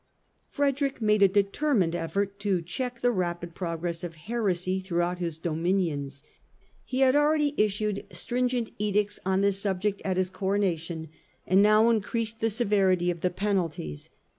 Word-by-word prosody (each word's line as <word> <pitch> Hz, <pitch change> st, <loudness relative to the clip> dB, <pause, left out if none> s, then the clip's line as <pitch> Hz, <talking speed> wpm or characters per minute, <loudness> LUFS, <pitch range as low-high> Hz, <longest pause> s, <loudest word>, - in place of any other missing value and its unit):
Frederick 280 Hz, -1 st, 0 dB
made 210 Hz, -2 st, +2 dB
a 200 Hz, -, +8 dB
determined 200 Hz, -, +1 dB
effort 195 Hz, +4 st, -2 dB
to 195 Hz, -4 st, 0 dB
check 245 Hz, +8 st, -4 dB
the 245 Hz, -, +3 dB
rapid 175 Hz, -4 st, -3 dB
progress 170 Hz, -1 st, -3 dB
of 170 Hz, -2 st, -6 dB
heresy 190 Hz, -1 st, -1 dB
throughout 175 Hz, -1 st, -1 dB
his 170 Hz, -3 st, -3 dB
dominions. 160 Hz, -4 st, -1 dB, 0.6 s
He 260 Hz, +1 st, -2 dB
had 265 Hz, 0 st, +5 dB
already 295 Hz, 0 st, +3 dB
issued 210 Hz, -2 st, 0 dB
stringent 245 Hz, -1 st, -1 dB
edicts 205 Hz, 0 st, 0 dB
on 190 Hz, 0 st, +2 dB
this 200 Hz, -1 st, +2 dB
subject 200 Hz, 0 st, -1 dB
at 190 Hz, -2 st, -1 dB
his 185 Hz, 0 st, +1 dB
ii2 -, -, -29 dB
STUPOR 195 Hz, -, -6 dB
MUNDI -, -, +1 dB, 0.2 s
Coronation 165 Hz, -1 st, -5 dB, 0.4 s
and 190 Hz, +2 st, +4 dB
now 215 Hz, +2 st, +5 dB
increased 225 Hz, +1 st, -1 dB
the 225 Hz, -, +1 dB
severity 195 Hz, -5 st, +2 dB
of 170 Hz, -2 st, -7 dB
the 180 Hz, -, +2 dB
penal 190 Hz, -1 st, 0 dB
ties. 75 Hz, -, -7 dB
195 Hz, 165 wpm, -27 LUFS, 175-220 Hz, 0.6 s, a